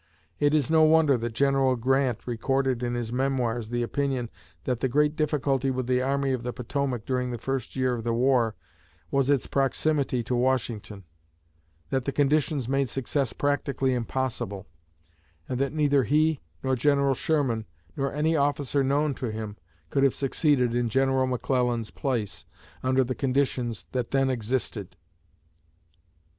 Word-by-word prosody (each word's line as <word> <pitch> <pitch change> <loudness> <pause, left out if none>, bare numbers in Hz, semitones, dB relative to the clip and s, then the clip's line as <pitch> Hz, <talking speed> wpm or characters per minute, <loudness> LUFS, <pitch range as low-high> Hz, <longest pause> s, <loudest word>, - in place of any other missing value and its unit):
It 145 +1 +3
is 150 0 +1
no 160 -1 +5
wonder 155 -2 +5
that 120 -1 -3
General 135 0 +3
Grant 130 0 +1
recorded 130 +1 0
in 120 0 -1
his 120 -1 -3
Memoirs 125 -4 -1
the 120 0 -1
opinion 130 -2 -2 0.3
that 125 +6 -1
the 130 - +1
great 150 +4 +2
difficulty 140 -3 0
with 130 -1 -1
the 125 0 +1
Army 135 0 0
of 125 - -2
the 125 +1 -3
Potomac 125 -1 -3
during 125 -1 -1
the 120 - -3
first 135 +2 -4
year 130 -1 +1
of 115 -2 -4
the 120 - 0
war 120 -2 +2 0.6
was 135 0 +2
its 140 -3 +2
proximity 135 -2 0
to 120 - -3
Washington; 120 -5 -1 0.9
that 130 -2 0
the 140 - 0
conditions 145 -2 +1
made 135 0 +1
success 135 0 -1
practically 140 -1 0
impossible; 115 -5 -3 0.8
and 125 - -3
that 140 0 0
neither 145 -2 +3
he, 155 +4 +2 0.2
nor 130 0 +1
General 140 +1 +3
Sherman, 130 -6 0 0.3
nor 140 0 -1
any 155 +2 +1
officer 145 -1 +1
known 140 +2 +1
to 130 - -4
him, 110 -1 -5 0.4
could 135 - +1
have 135 -2 +3
succeeded 135 -3 +1
in 120 -1 0
General 135 +1 +2
McClellan's 125 -2 0
place, 120 -7 -3 0.4
under 130 +1 +2
the 130 +1 -2
conditions 125 -4 -1
that 125 -2 -2
then 135 -1 +2
existed. 115 -5 -3
130 Hz, 155 wpm, -26 LUFS, 120-140 Hz, 0.9 s, no